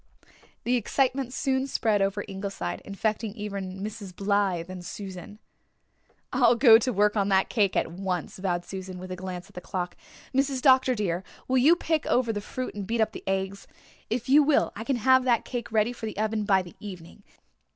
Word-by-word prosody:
The 245 +1 +2
excitement 260 +2 0
soon 265 0 0
spread 220 -6 +1
over 200 +1 0
Ingleside, 195 - -4
infecting 215 +1 -2
even 195 -3 -5
Mrs. 205 -3 -7
Blythe 195 -4 0
and 185 -1 -8
Susan. 190 +1 -8 1.0
"I'll 245 -2 +5
go 230 -2 +8
to 255 +2 0
work 210 0 +2
on 200 -1 +1
that 190 -1 +3
cake 205 -5 +2
at - - 0
once," 180 0 -4
vowed 175 -2 -1
Susan, 190 -1 -7
with 185 +1 -8
a - - -3
glance 180 0 -6
at 205 - -20
the 180 - -7
clock. 180 -1 -4 0.4
"Mrs. 270 0 +1
Dr. 260 -1 +5
dear, 190 -4 -1 0.2
will 260 0 +3
you 305 +7 +6
pick 320 -3 -1
over 240 -3 +2
the 205 - -3
fruit 255 +4 -5
and 200 -2 -6
beat 230 +1 -1
up 220 -1 +2
the - - -9
eggs? 195 +1 -2 0.4
If 230 +1 -2
you 285 +3 +7
will 290 0 +3
I 225 - -5
can 270 +3 0
have 260 +2 +4
that 240 -3 +2
cake 240 -2 -5
ready 220 +2 +2
for 230 -2 -6
the 215 - -7
oven 215 0 0
by 195 -2 +3
the 175 - -13
evening. 185 -1 -10
210 Hz, 195 wpm, -27 LUFS, 190-245 Hz, 1.0 s, go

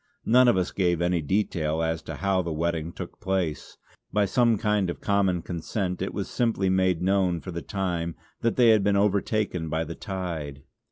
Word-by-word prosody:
None 125 +2 +5
of 120 - +4
us 90 -1 0
gave 90 -3 +1
any 90 0 +1
detail 80 -2 0
as 80 0 -1
to - - -7
how 95 -1 +1
the 85 -2 -4
wetting 80 +1 -1
took - - -8
place; 95 -5 -2 0.3
by 105 0 +2
some 115 +2 +3
kind 105 -3 +1
of 85 - -5
common 95 -4 +1
consent 90 +2 -3
it - - -2
was - - -4
simply 110 -6 0
made 95 -2 +2
known 95 -2 +2
for 90 - -7
the 85 0 -4
time 85 -4 -2 0.2
that 115 - 0
they 120 -2 +5
had 110 -3 +5
been 100 0 +3
overtaken 100 -3 0
by 80 +1 0
the 80 +1 -6
tide. 85 -8 -5
95 Hz, 190 wpm, -26 LUFS, 85-100 Hz, 0.3 s, None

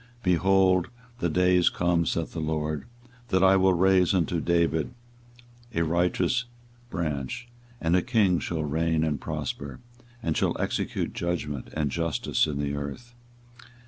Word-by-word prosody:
24:023:005 - - -29
Behold, 95 0 +3 0.3
the 85 - 0
days 90 +1 +4
come, 85 -1 +1
saith 85 -1 -2
the 85 - -4
LORD, 75 -1 -2 0.4
that 95 -4 +2
I 95 0 +6
will 95 -1 +4
raise 95 +1 +4
unto 85 -2 +1
David 85 +3 +1 0.8
a 85 - +2
righteous 90 +9 +1 0.4
Branch, 75 - -3 0.3
and 80 +1 +2
a 90 - +4
King 105 -8 +2
shall 80 -2 -3
reign 80 +2 0
and 75 -3 -1
prosper, 75 -3 -5 0.4
and 80 -2 0
shall - - 0
execute - - -2
judgment 75 -6 -3
and 75 -3 0
justice 85 -2 0
in 75 -2 -3
the 70 -1 -1
earth. 70 - -6
85 Hz, 145 wpm, -27 LUFS, 75-90 Hz, 0.8 s, I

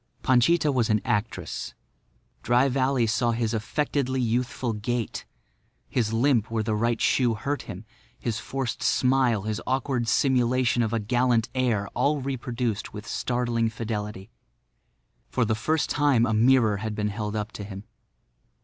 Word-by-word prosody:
Panchita 145 +5 +3
was 125 -4 +1
an 105 0 +3
actress. 105 +2 -2 0.7
Dry 120 +3 +3
Valley 130 -1 +1
saw 115 +2 +1
his 115 -1 -1
affectedly 130 +3 -1
youthful 120 0 -1
gait, 115 +2 -3 0.6
his 115 -4 0
limp 120 -1 +2
where 115 -1 -1
the 110 0 -1
right 115 +2 0
shoe 120 -4 +2
hurt 140 +7 -2
him, 95 +4 -7 0.3
his 115 -2 -3
forced 135 0 -4
smile, 125 -5 +2
his 110 +1 -3
awkward 130 -2 0
simulation 125 -1 +2
of 110 -2 0
a 115 - 0
gallant 120 +2 +1
air, 120 -6 0
all 145 +1 +1
reproduced 125 -4 -3
with 105 +1 -7
startling 120 -1 -1
fidelity. 105 -2 -5 1.0
For 125 - +1
the 110 - +1
first 150 +8 0
time 140 -6 +3
a 110 - 0
mirror 115 -2 +4
had 110 +1 -4
been 105 0 -1
held 105 +1 -4
up 105 0 -3
to 105 - -7
him. 100 0 -8
120 Hz, 150 wpm, -26 LUFS, 110-130 Hz, 1.0 s, mirror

